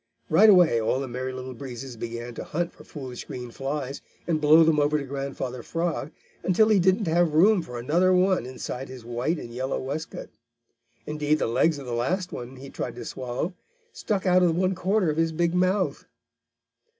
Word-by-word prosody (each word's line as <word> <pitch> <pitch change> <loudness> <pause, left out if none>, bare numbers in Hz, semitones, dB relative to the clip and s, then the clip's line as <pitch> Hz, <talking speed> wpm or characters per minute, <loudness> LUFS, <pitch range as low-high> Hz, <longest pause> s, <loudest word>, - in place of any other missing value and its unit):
Right 200 +8 +7
away 175 - +6
all 120 +4 +1
the 135 - -3
Merry 130 +1 -4
Little 130 0 -6
Breezes 125 0 -7
began 120 +1 -6
to - - -6
hunt 170 +2 -3
for - - -15
foolish 130 -5 -8
green 125 -1 -7
flies 135 +1 -4 0.2
and 160 -3 0
blow 155 +2 +7
them 160 -2 +3
over 145 +1 +2
to 145 - -3
Grandfather 135 -2 -4
Frog, 165 0 -2 0.3
until 215 +4 +3
he 210 -3 +5
didn't 190 +4 +3
have 165 -1 +2
room 195 +4 +5
for 125 -6 -8
another 165 +10 +2
one 185 -7 +3
inside 130 0 -6
his 130 -3 -10
white 120 +8 -1
and 120 -5 -8
yellow 130 +2 -2
waistcoat. 150 +5 -5 0.7
Indeed 150 0 0
the - - 0
legs 140 +7 +2
of 140 - -8
the 120 - -4
last 175 +11 -1
one 125 +2 -7
he 135 +1 -10
tried 120 - -4
to 120 -1 -7
swallow 130 +8 -4 0.4
stuck 200 -3 -2
out 185 0 +5
of 170 -2 +3
one 185 +1 +2
corner 185 -1 +1
of 150 - -5
his 165 0 +2
big 170 +1 0
mouth. 185 +2 +1
150 Hz, 195 wpm, -26 LUFS, 130-175 Hz, 0.7 s, Right